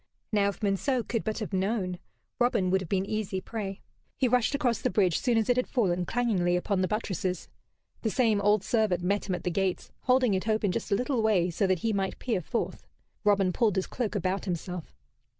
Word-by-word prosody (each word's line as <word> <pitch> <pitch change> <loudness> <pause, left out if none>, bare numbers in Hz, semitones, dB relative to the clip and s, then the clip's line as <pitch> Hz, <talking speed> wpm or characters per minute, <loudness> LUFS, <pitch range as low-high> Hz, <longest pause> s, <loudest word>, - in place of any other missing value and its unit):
Now, 205 -2 +3
if 200 - -7
Monceux 220 +5 +1
could 230 -2 -1
but 220 - -2
have 215 -3 -5
known, 190 -2 -1 0.4
Robin 230 -7 +2
would 190 0 +3
have 180 - -7
been 195 -1 +1
easy 205 -2 -2
prey. 195 -1 -5 0.4
He 260 - +2
rushed 250 +2 +2
across 250 -6 0
the - - +1
bridge 185 -3 +2
soon 240 -3 +2
as 220 - +1
it 245 - +3
had 250 - +1
fallen, 180 -7 0
clangingly, 200 -8 +1
upon 185 +2 0
the 185 - +2
buttresses. 190 -4 -2 0.5
The 225 - 0
same 220 -3 +2
old 205 0 +3
servant 210 -6 +1
met 200 +2 0
him 185 - +1
at 175 - -7
the 180 - -1
gates, 190 0 -1
holding 255 -3 +4
it 190 +3 -1
open 215 -3 +2
just - - -4
a - - +5
little 250 +1 0
way 190 -5 +2
so 190 +4 +1
that 185 -2 +2
he 225 - +2
might 195 -1 -1
peer 230 -7 -1
forth. 230 +8 -3 0.4
Robin 195 -3 +3
pulled 220 -3 +2
his 190 - 0
cloak 230 -4 -3
about 190 0 -1
himself. 180 -1 -5
200 Hz, 215 wpm, -28 LUFS, 185-225 Hz, 0.5 s, a